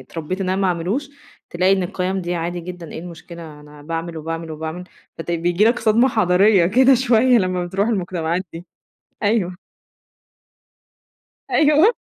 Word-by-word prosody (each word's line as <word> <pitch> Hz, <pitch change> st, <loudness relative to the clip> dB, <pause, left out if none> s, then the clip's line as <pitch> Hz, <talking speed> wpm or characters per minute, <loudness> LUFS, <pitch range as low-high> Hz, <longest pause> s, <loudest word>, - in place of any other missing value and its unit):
اتربيت 170 Hz, +4 st, -6 dB
إن 190 Hz, -, -1 dB
أنا 185 Hz, -, +1 dB
ما -, -, +3 dB
أعملوش، 190 Hz, -, -2 dB, 0.4 s
تلاقي 185 Hz, +2 st, +2 dB
إن 190 Hz, -1 st, +2 dB
القيم 185 Hz, +1 st, -2 dB
دي 175 Hz, 0 st, -3 dB
عادي 175 Hz, +1 st, -3 dB
جدًا، 175 Hz, -1 st, -9 dB
إيه -, -, -6 dB
المشكلة 165 Hz, -2 st, -10 dB
أنا 150 Hz, 0 st, -15 dB
باعمل 165 Hz, +2 st, -5 dB
وباعمل 165 Hz, +1 st, -5 dB
وباعمل، 160 Hz, +3 st, -6 dB, 0.3 s
فت 165 Hz, -, -5 dB
بييجي 175 Hz, +4 st, +1 dB
لك 235 Hz, +2 st, +3 dB
صدمة 230 Hz, +4 st, +3 dB
حضارية 195 Hz, -3 st, +4 dB
كده 260 Hz, +8 st, +5 dB
شوية 245 Hz, 0 st, +4 dB
لمّا 185 Hz, -2 st, -1 dB
بترُوح 195 Hz, +5 st, -1 dB
المجتمعات 180 Hz, -4 st, -1 dB
دي، 165 Hz, +1 st, -9 dB, 0.6 s
أيوه. 205 Hz, -4 st, 0 dB, 1.9 s
أيوه، 305 Hz, +6 st, +5 dB
180 Hz, 150 wpm, -20 LUFS, 170-210 Hz, 1.9 s, كده